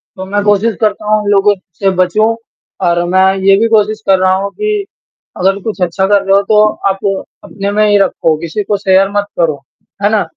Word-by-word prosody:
तो 190 0 -7
मैं 205 +1 -2
कोशिश 205 +2 +1
करता 210 0 -1
हूँ 215 - +2
उन 205 - -3
लोगों 205 +1 +3 0.3
से 195 - +2
बचूँ 215 +5 +1 0.5
और 175 0 +1
मैं 190 +1 +3 0.2
ये 195 0 +5
भी 230 - +2
कोशिश 215 0 +1
कर 190 -1 +4
रहा 185 0 +2
हूँ 200 +1 -3
कि 425 -1 -2 0.5
अगर 195 +2 +1
कुछ 210 -4 -5
अच्छा 180 +2 0
कर 200 -1 +3
रहे 195 0 +2
हो 200 - +4
तो 210 -1 +5 0.3
आप 195 0 -2 0.4
अपने 200 0 -5
में 215 +1 +2
ही 205 - +4
रखो। 165 -4 +1
किसी 170 +6 -4
को 205 +1 -1
शेयर 195 0 +2
मत 205 - 0
करो। 155 -5 0 0.4
है 205 - +3
ना। 215 -2 +2
200 Hz, 215 wpm, -12 LUFS, 190-210 Hz, 0.5 s, ये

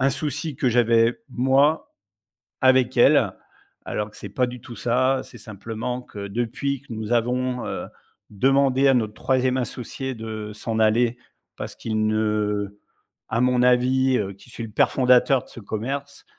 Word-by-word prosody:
un 135 +1 +3
souci 150 +2 -3
que 130 - +1
j'avais 115 -1 +3
moi 135 +5 +2 0.7
avec 130 -1 +4
elle, 120 - +5 0.5
alors 105 0 -3
que - - -15
c'est 100 - -8
pas 125 +6 0
du 125 -1 -8
tout 120 - -10
ça. 130 +3 +1
C'est 120 - -13
simplement 115 +4 -5
que 100 -5 -8
depuis 120 +5 -2
que 130 - -10
nous 110 0 -5
avons, 125 +1 0
heu, - - -4 0.4
demandé 135 +4 +3
à 135 - +5
notre 110 -3 0
3e 130 +1 +1
associé 130 +2 -4
de 110 -1 -6
s'en 110 +1 -3
aller 115 +2 +3 0.4
parce - - -6
qu'il 110 -1 -1
ne 105 -2 -1 0.5
à 115 +2 0
mon 125 0 +3
avis, 130 +1 +3
heu, 100 -2 -2
qui 100 +5 -19
suis 115 - -7
le 115 - -6
père 105 - +3
fondateur 125 0 +4
de - - -20
ce - - -11
commerce, 135 +7 -5
125 Hz, 165 wpm, -23 LUFS, 110-130 Hz, 0.7 s, elle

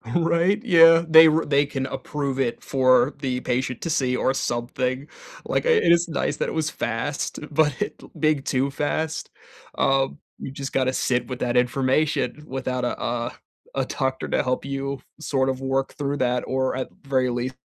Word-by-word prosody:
Right? 175 +5 +2
Yeah, 165 -5 +7
they 160 0 +9
r 160 +1 +2
they 145 0 +3
can 135 -2 -4
approve 140 -2 -4
it 125 -3 -1
for 130 0 +3
the 130 -2 -1
patient 130 0 -2
to 165 - -3
see 130 -5 +1
or 130 +1 +1
something. 125 +3 -2 0.4
Like, - - -1
uh, - - +2
it 445 - +4
is 170 +1 +4
nice 160 - -2
that - - -1
it - - -5
was 160 0 -1
fast, 140 +4 -3
but 150 -1 +2 0.5
big 155 -3 +1
too 135 +1 0
fast. 155 +3 -2 0.5
Um, 135 +1 +1 0.2
you - - -7
just 135 0 -6
gotta 130 -1 +1
sit 125 -2 0
with 125 -1 -6
that 125 0 0
information 135 +4 +1
without 130 -1 -3
a, 120 - -2
uh 120 0 -2 0.4
a - - -1
doctor 130 0 -2
to - - +1
help 130 0 -1
you 140 -1 -4 0.2
sort 135 -4 0
of 130 0 -2
work 135 0 -1
through 145 -1 -2
that 125 -1 0
or 130 0 0
at 130 - -3 0.2
very 130 -2 +1
least 125 +2 -3
135 Hz, 180 wpm, -23 LUFS, 130-150 Hz, 0.5 s, they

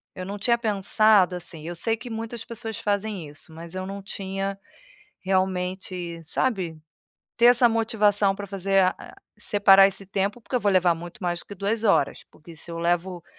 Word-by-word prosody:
eu 185 - -6
não 200 +2 -5
tinha 235 +3 +2
pensado 210 -3 +3
assim, 160 -2 -7
eu 175 - -5
sei 225 +6 +1
que 220 +3 -9
muitas 225 0 -5
pessoas 225 -2 -6
fazem 205 -4 -2
isso, 150 +2 -13
mas 165 +2 -10
eu 185 0 -4
não 200 +1 -6
tinha 195 0 -4 0.6
realmente, 185 -2 -2
sabe, 175 -4 -2 0.6
ter 235 - +5
essa 245 0 +6
motivação 210 -3 +2
para 205 0 -6
fazer, 195 0 +2
a 185 - -3 0.2
separar 200 -2 +5
esse 195 0 -9
tempo, 200 +4 -2
porque 235 - -9
eu 250 - +2
vou 205 -1 +2
levar 180 -2 +4
muito 175 +5 -10
mais 175 -1 -1
do - - -15
que 205 - -9
2 205 +4 -1
horas, 195 -9 +2
porque 165 +2 -15
se 160 +2 -8
eu 165 - -5
levo 175 +1 -1
195 Hz, 185 wpm, -25 LUFS, 180-215 Hz, 0.6 s, essa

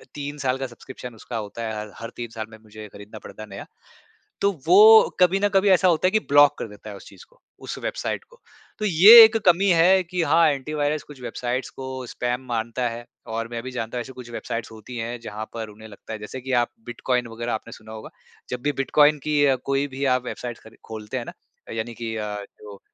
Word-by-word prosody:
3 145 0 -5
साल 130 -2 -1
का 135 0 -4
सब्सक्रिप्शन 125 0 -11
उसका 115 +1 -7
होता 110 +2 -6
है, 110 -1 -3
हर 105 0 -7
हर 115 - -7
3 120 -1 -6
साल 110 -1 -6
में 110 - -13
मुझे 110 0 -11
खरीदना 105 +2 -11
पड़ता 100 +2 -10
है, - - -10
नया। 100 - -8 0.8
तो 200 - +3 0.2
वो 215 +5 +8
कभी 180 +1 +4
न 205 - +3
कभी 195 +1 +3
ऐसा 185 0 +5
होता 175 +1 +3
है 185 - +1
कि 215 - +3
ब्लॉक 145 0 +6
कर - - -4
देता 105 +1 -12
है 105 - -8
उस 100 - -13
चीज़ - - -15
को, - - -28 0.2
उस - - -7
वेबसाइट - - -3
को। 485 0 -21 0.4
तो 215 - -1
ये 210 +6 +10
एक 225 0 +5
कमी 185 +2 +4
है 180 +3 +5
कि 180 +1 -3
हाँ, 160 +1 +4
एंटी 140 +1 -3
वायरस 150 0 -1
कुछ 145 -3 -14
वेबसाइट्स 125 +1 -3
को 130 -1 -7
स्पैम 125 +1 -3
मानता 115 +1 -2
है 120 +1 -8 0.2
और 115 0 -3
मैं 115 -1 -4
भी 130 - -6
जानता 120 -1 -4
हूँ, - - -1
ऐसी 130 - -9
कुछ 125 -2 -11
वेबसाइट्स 115 -1 -5
होती 110 +3 -10
हैं, 120 +1 -4
जहाँ 110 -1 -7
पर 110 -2 -5
उन्हें 110 +1 -13
लगता 105 +1 -10
है 110 - -6
जैसे 105 +5 -8
कि 130 +1 -6
आप 120 - -7
बिटकॉइन 120 0 -2
वगैरह 115 +1 -4
आपने 110 +1 -5
सुना 110 0 -13
होगा। 110 0 -9 0.4
जब 125 -1 -4
भी 145 - 0
बिटकॉइन 150 +2 +4
की 150 -1 +1 0.3
कोई 140 +1 0
भी 135 - -3
आप 125 - -9
वेबसाइट 120 -1 -6
खरी 110 0 -15
खोलते 110 +3 -6
हैं 120 - -4
ना, - - -8 0.4
यानी 115 +1 -4
कि 115 -1 -5
अ, 105 -1 -4 0.2
जो 100 -2 -12
125 Hz, 235 wpm, -23 LUFS, 110-150 Hz, 0.8 s, ये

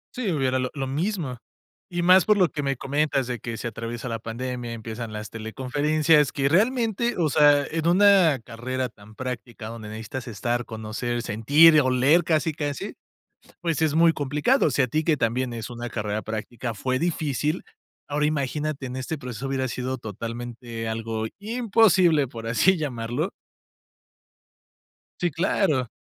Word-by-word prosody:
Sí, 235 -7 -1
hubiera 130 -4 +1
lo 125 0 -1
lo 135 -2 -2
mismo, 150 - -2 0.5
y 175 -1 -2
más 185 +1 +6
por 210 -1 +4
lo 180 -3 +5
que 145 - -4
me 140 -1 0
comentas 140 0 0
de 120 -1 -4
que 115 -2 -5
se 120 - -4
atraviesa 115 +2 -6
la 115 -1 -3
pandemia, 120 +1 -5
empiezan 115 0 -6
las 105 0 -6
teleconferencias, 145 +6 +1
que 140 -1 0
realmente, 230 - +2
o 165 -3 +2
sea, 145 -2 +5
en 165 0 -1
una 185 -5 +5
carrera 125 +2 -3
tan 110 0 -17
práctica 120 -3 -6
donde 115 -2 -8
necesitas 115 +4 -6
estar, 120 +2 -2
conocer, 115 +2 -4
sentir, 145 +9 +6
o 130 - +1
leer 140 +7 +4
casi, 160 0 +1
casi, 145 -2 -4 0.7
pues 165 -3 -1
es 155 -1 +2
muy 165 0 +5
complicado. 150 - +2
O - - 0
sea, 135 - +2
a - - -10
ti, 155 +6 0
que 160 -2 +2
también 120 +1 0
es 115 0 -6
una 120 0 -6
carrera 105 -1 -3
práctica, 115 +2 -5
fue 130 +5 -1
difícil, 155 -1 -1 0.4
ahora 150 +1 0
imagínate, 150 -1 -2
en 125 0 -5
este 130 +5 -4
proceso 125 -2 -6
hubiera 135 -1 -1
sido 130 +1 -3
totalmente 115 +1 -6
algo 110 0 -3
imposible, 200 - +3
por 115 -2 -7
así 180 - +3
llamarlo 130 - -2 1.9
Sí, 175 -2 0
claro. 155 - +1
130 Hz, 160 wpm, -25 LUFS, 120-160 Hz, 1.9 s, más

